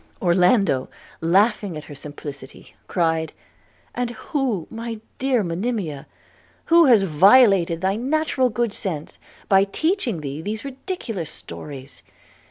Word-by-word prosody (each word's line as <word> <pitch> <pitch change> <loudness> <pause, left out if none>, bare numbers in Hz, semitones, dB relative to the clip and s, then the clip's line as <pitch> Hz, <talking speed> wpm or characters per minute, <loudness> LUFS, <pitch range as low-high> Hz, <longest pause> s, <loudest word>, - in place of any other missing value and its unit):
Orlando, 180 - +3 0.3
laughing 195 +1 +2
at 150 - -7
her 150 - -11
simplicity, 145 -1 -9
cried, 160 -2 0 0.6
'And 245 -1 -2
who, 245 - -2
my 230 0 -5 0.2
dear 260 -4 +1
Monimia, 175 - -3 0.6
who 335 0 +6
has 235 -7 +6
violated 190 - +5
thy 190 +2 0
natural 265 0 +1
good 235 -1 -1
sense 170 -10 -5 0.3
by 195 0 +5
teaching 245 - -1
thee 145 +1 -5
these 215 +7 -5
ridiculous 265 - -5
stories? 135 -2 -8
195 Hz, 115 wpm, -22 LUFS, 160-245 Hz, 0.6 s, who